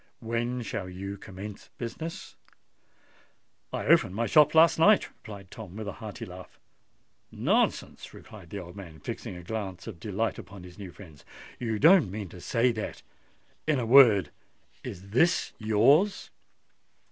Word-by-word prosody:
When 120 +1 -2
shall 95 -4 -4
you 100 +2 -6
commence 100 +1 -10
business?" 160 +8 -6 1.4
"I - - -3
opened 90 - +4
my 115 +2 0
shop 150 +4 +5
last 160 0 +6
night," 205 +5 +5
replied 100 -4 -12
Tom 100 -5 -10
with 110 -1 -6
a - - -2
hearty 105 -2 -7
laugh. 90 0 -12 0.7
"Nonsense!" - - 0
cried 95 -6 -13
the 100 - -6
old 90 -1 -9
man, 85 -6 -10
fixing 80 - -6
a 90 - -9
glance 95 -2 -5
of 105 -7 -8
delight 105 +3 -2
upon 100 -2 -11
his 90 +1 -13
new 95 -3 -8
friend. 80 -7 -14 0.4
"You 115 -3 -2
don't 165 - +6
mean 100 -1 -6
to 90 - -12
say 120 +5 +2
that——In 120 +6 -6
a 120 - -1
word, 110 - +7 0.5
is 95 +1 -8
this 170 +10 +2
yours?" 125 - +3
105 Hz, 145 wpm, -28 LUFS, 95-120 Hz, 1.4 s, word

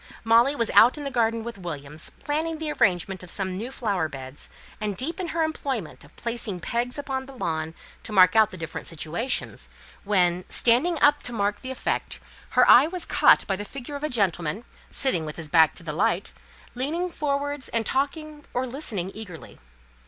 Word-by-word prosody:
Molly 230 +5 +4
was 230 -5 0
out 245 +6 +6
in 295 - -6
the 275 - -3
garden 230 -2 +1
with 230 -2 -7
Williams, 150 -3 -4
planning 315 +2 -3
the 310 -1 -3
arrangement 190 - +1
of 180 - -9
some 190 0 -2
new 220 +8 -5
flower 200 -11 -1
beds, 135 0 -9 0.3
and 210 -3 -2
deep 325 - -3
in 365 - -2
her 330 0 0
employment 270 - -3
of - - -19
placing 235 -5 -2
pegs 240 - -2
upon 265 -2 -4
the 275 - -11
lawn 160 -4 -3 0.3
to - - -8
mark 185 -2 +6
out 220 -1 +6
the 185 - -10
different 165 -2 -6
situations, 165 - -3 0.3
when, 180 -3 +2
standing 285 +8 +3
up 290 0 +5
to 245 - -3
mark 205 -2 -1
the 255 - -7
effect, 260 - -3 0.3
her - - +4
eye 265 +5 +8
was 355 0 -2
caught - - +5
by 195 - 0
the 205 - -5
figure 270 +5 -8
of 285 - -6
a 305 - 0
gentleman, 195 - 0 0.3
sitting 260 - +2
with 150 -1 -6
his 160 -3 -7
back 160 0 +5
to - - -9
the 155 -2 -4
light, 175 +2 0 0.4
leaning 305 +8 -2
forwards 285 -2 -2
and 230 -1 -1
talking, 295 +3 -2
or 250 +1 0
listening, 235 - -2
eagerly. 180 - -10
230 Hz, 190 wpm, -25 LUFS, 180-275 Hz, 0.4 s, eye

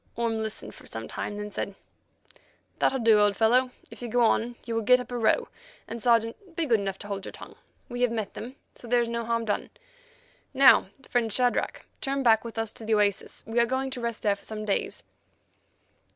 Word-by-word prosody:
Orme 230 -1 -1
listened 220 -1 -4
for - - -14
some - - -6
time, 205 - -5
then 210 0 -5
said: 200 0 -4 1.0
"That'll 265 - +2
do, 225 -3 +5
old 205 -1 +3
fellow; 250 +3 +4 0.2
if - - -12
you 240 - -4
go 240 +1 +2
on, 235 +2 +1
you 230 - -3
will 225 - 0
get 250 +4 +5
up 250 - -7
a - - -3
row, 220 - +2 0.4
and, 230 0 -6
Sergeant, 235 - +1
be 335 -2 0
good 235 -6 +3
enough 195 -1 -3
to 205 - -9
hold 200 -1 -4
your - - -7
tongue. - - -11 0.3
We 245 -1 -5
have 245 - +4
met 220 -3 -3
them, 250 +4 -8 0.2
so 240 - -11
there 240 +1 +3
is 235 - -1
no 235 0 -2
harm 230 0 -1
done. 210 - -2 0.9
Now, 265 -7 +7 0.2
friend 235 -3 0
Shadrach, 245 +2 0 0.2
turn 275 0 -1
back 225 -3 +5
with 230 -1 -8
us 225 -1 -2
to - - -11
the 220 0 +2
oasis. 205 -2 0
We 225 +1 0
are 235 - +4
going 265 +1 -1
to 250 - -5
rest 235 -2 -3
there 205 -1 +3
for 200 - -17
some 215 -1 -5
days." 200 - -2
230 Hz, 220 wpm, -27 LUFS, 215-245 Hz, 1.0 s, Now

